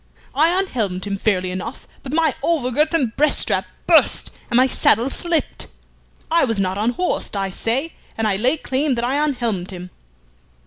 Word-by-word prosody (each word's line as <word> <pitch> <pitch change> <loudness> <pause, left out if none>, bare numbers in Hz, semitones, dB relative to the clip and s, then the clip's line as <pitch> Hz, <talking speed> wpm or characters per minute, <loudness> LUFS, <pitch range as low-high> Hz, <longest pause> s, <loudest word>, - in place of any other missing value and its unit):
"I 325 +6 +3
unhelmed 210 - -2
him 200 -1 -2
fairly 185 -3 0
enough, 185 +7 -6
but 260 - -7
my 320 -2 +2
over 290 -5 0
girth 305 +6 +1
and 255 -8 0
breast 300 +1 +3
strap - - 0 0.2
burst, - - +4 0.2
and 240 - +2
my 255 - +6
saddle 250 0 +2
slipped. 340 -3 -1 0.6
I 335 0 +4
was 225 -6 0
not 190 0 0
unhorsed, 240 - -1
I 195 -1 -1
say, 260 - -1 0.2
and 225 -1 +1
I 200 - +2
lay 250 +10 +2
claim 270 0 0
that 235 - -2
I 280 +4 +1
unhelmed 235 -11 -1
him." 180 -1 -8
245 Hz, 175 wpm, -20 LUFS, 200-300 Hz, 0.6 s, my